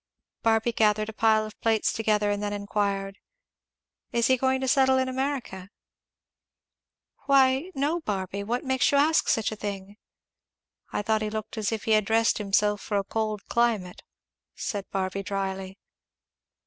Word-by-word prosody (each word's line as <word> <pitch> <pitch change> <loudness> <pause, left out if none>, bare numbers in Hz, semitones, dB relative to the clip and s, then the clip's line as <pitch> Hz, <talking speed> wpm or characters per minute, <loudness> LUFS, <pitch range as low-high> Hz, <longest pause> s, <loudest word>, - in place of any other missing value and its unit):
Barby 225 +1 +2
gathered 215 -1 +2
a - - -7
pile 220 0 +3
of 215 - -12
plates 225 -2 +1
together 210 -2 +1
and 205 0 -2
then 205 0 -2
enquired, 200 -1 -2 0.9
"Is 235 -1 +1
he 260 - +4
going 260 +1 +1
to 265 - -1
settle 265 -1 +4
in 260 0 +1
America?" 260 -8 -3 1.6
"Why 270 +3 +4
no, 290 +5 0
Barby! 200 - -3
What 240 +4 -2
makes 260 -1 +2
you 285 - +3
ask 310 +3 +3
such 220 -1 +1
a - - -4
thing?" 205 -1 -6 0.9
"I - - -2
thought 220 0 +1
he 215 - -1
looked 215 +1 -5
as 215 -1 -1
if 220 -2 -3
he 225 - -1
had 215 -1 +4
dressed 225 +1 +2
himself 205 0 +1
for 205 - -2
a 200 - 0
cold 215 -1 -3
climate," 225 -7 0 0.5
said 200 -2 -4
Barby 190 0 -2
dryly. 195 -1 -4
215 Hz, 160 wpm, -26 LUFS, 200-240 Hz, 1.6 s, he